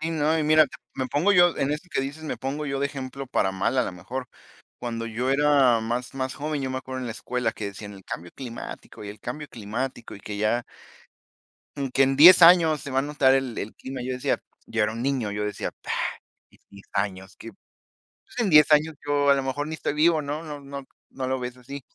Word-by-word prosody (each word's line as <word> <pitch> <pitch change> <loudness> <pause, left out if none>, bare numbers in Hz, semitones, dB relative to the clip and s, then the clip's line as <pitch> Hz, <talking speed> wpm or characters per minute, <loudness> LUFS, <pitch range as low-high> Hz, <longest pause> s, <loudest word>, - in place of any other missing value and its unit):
Sí, 160 +1 -2
no, 160 0 +1
y - - +1
mira, 155 +1 +6 0.3
me 130 -1 -2
pongo 165 +11 +2
yo, 175 -2 +5
en 140 0 0
eso 155 +5 -4
que - - 0
dices, 140 +4 -5
me 130 - -4
pongo 135 +4 -3
yo 135 -1 -2
de 140 - +2
ejemplo 135 -1 -7
para 95 -6 0
mal, 95 +7 -1
a 125 - +4
la - - -4
mejor, 120 +9 -6 0.5
cuando 115 -1 -4
yo 120 +4 -2
era 135 -4 +4
más 120 +3 -3
más 130 -1 -3
joven, 150 0 -3
yo 130 -1 -3
me 130 - -3
acuerdo, 130 0 -6
en 125 - -4
la 115 - -4
escuela, 120 +1 -2
que 110 - -5
decían: 100 +1 -8
"El 95 - -14
cambio 85 +1 -7
climático, 120 -4 -8
y 100 - -7
el 105 - -10
cambio 150 +4 -6
climático 120 +3 -5
y 100 - -12
que 100 0 -6
ya" 110 +3 +1 1.1
"y 140 -2 -3
que, 135 - +3
en 135 0 +2
10 175 +5 +10
años 165 -3 +7
se 140 - -7
va 130 - +1
a - - +3
notar 140 -2 +3
el 130 -4 -1
el 105 - -5
clima". 130 -1 -7
Y 125 - -5
yo 130 - -1
decía, 125 - -1 0.3
yo 115 -1 0
era 110 - +1
un 115 +1 -5
niño, 130 -5 0
yo 105 +1 -2
decía: 105 -1 -3 0.8
"en - - -25
10 100 0 -15
años 95 -1 -3
qué, 115 - -9 0.6
pues, - - -13
en 220 -5 +2
10 150 -1 +7
años 155 +1 +4
yo, 145 -1 +2
a 140 - +7
lo 135 - -1
mejor, 140 +3 -2
ni 160 - -5
estoy 145 - -2
vivo, 155 +1 +3
¿no?" 150 +3 -4
No 150 -2 -7
no 140 -1 -8 0.2
no 130 -1 -5
lo 130 0 -1
ves 125 0 -6
así. 135 +3 -8
130 Hz, 240 wpm, -25 LUFS, 115-145 Hz, 1.1 s, 10